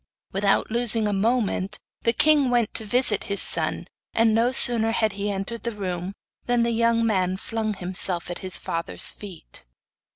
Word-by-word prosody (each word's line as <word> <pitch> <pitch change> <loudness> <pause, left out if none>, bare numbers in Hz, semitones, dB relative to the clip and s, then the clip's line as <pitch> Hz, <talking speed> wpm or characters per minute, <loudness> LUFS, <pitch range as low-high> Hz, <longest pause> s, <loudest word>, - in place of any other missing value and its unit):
Without 195 +2 0
losing 230 -2 +1
a 205 - -1
moment 210 -1 -1 0.2
the 230 - +2
king 290 +2 +3
went 240 -3 0
to 220 - -1
visit 225 -1 +3
his 200 -1 -3
son, - - +2 0.3
and 225 -1 +3
no 230 +3 +2
sooner 235 -3 +4
had 220 -2 0
he 200 +1 -3
entered 200 +4 -5
the 235 -2 -5
room 185 -1 -5 0.3
than 245 -1 +1
the 235 - 0
young 230 0 +1
man 185 -4 0
flung 220 +1 -4
himself 180 -1 -2
at 175 - -5
his 185 -1 -1
father's 165 0 -2
feet. 175 - -12
215 Hz, 170 wpm, -23 LUFS, 195-235 Hz, 0.3 s, sooner